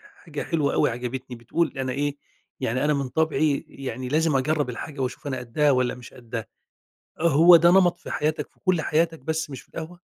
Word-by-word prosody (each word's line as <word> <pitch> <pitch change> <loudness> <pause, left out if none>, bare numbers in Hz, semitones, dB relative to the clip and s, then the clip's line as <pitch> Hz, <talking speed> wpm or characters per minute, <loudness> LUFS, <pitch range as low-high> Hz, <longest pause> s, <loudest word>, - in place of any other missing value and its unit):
حاجة 155 - -6
حلوة 155 -4 0
أوي - - +3
عجبتني، 125 +2 -5
بتقول 120 +9 -1
أنا 130 -1 -2
إيه 145 +2 -2 0.4
يعني 130 +5 0
أنا 150 - +3
من 140 -2 -1
طابعي 155 0 +1
يعني 130 -2 -6
لازم 155 +1 +2
أجرب 145 +1 +1
الحاجة 140 +4 -7
وأشوف 130 +2 -4
أنا 130 -2 -2
قدها 140 +5 +1
والَّا 125 -1 +1
مش 125 -1 -12
قدها، 115 -2 -6 0.8
هو 170 +2 +7
ده 170 +1 +5
نمط 180 -1 +4
في - - -10
حياتك 155 +2 -1
في - - -34
كل 185 -4 +2
حياتك 165 +2 +1
بس 160 +2 -2
مش 135 - -7
في - - -28
القهوة؟ 170 +2 -8
145 Hz, 195 wpm, -25 LUFS, 130-160 Hz, 0.8 s, هو